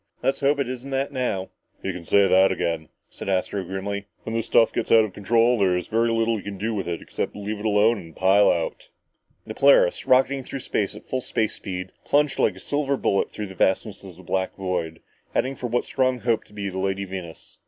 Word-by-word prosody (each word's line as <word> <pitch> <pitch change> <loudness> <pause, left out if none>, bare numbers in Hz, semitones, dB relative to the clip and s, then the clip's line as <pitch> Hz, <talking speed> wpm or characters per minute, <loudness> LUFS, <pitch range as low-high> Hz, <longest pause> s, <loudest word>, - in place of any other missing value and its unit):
"Let's 135 +2 +1
hope 140 +1 +2
it 140 -3 -1
isn't 130 +1 -6
that 135 +1 -1
now!" 125 -8 -2 0.3
"You 95 - -2
can 85 -1 -8
say 100 +2 +4
that 95 +1 +5
again," 80 -2 -2 0.2
said - - -7
Astro 95 +1 0
grimly. 100 +2 -4 0.2
"When 110 - -5
this 115 -1 -1
stuff 115 - +4
gets - - -2
out 110 -1 +7
of 100 - -9
control, 115 +4 +2
there's 90 -2 +2
very 115 +1 +2
little 115 0 +1
you - - -6
can 100 0 -7
do 110 +4 -2
with 100 -4 -3
it, 85 -1 -3
except - - -4
leave 105 +1 -4
it 105 - -7
alone 105 +2 +3
and 80 -3 -12
pile 95 +2 +5
out!" - - -2 0.6
The - - -6
Polaris, - - +4
rocketing 135 +1 +3
through 135 +1 -6
space 105 -3 -1
at 105 - -12
full 130 - -2
space 110 -3 -1
speed, 95 -2 -6
plunged 145 0 +2
like - - +2
a - - -11
silver 140 -1 -1
bullet 100 - +1
through 105 - -5
the 95 - -9
vastness 95 +2 0
of 95 -3 -10
the 95 - -13
black 95 +1 -2
void, 90 -4 -3 0.3
heading 135 +1 0
for 125 - -4
what 120 +1 0
Strong 130 -2 0
hoped 115 -2 0
to - - -20
be 100 -1 -4
the 95 0 -5
Lady 95 +1 -1
Venus. 90 -3 -9
105 Hz, 225 wpm, -24 LUFS, 95-125 Hz, 0.6 s, out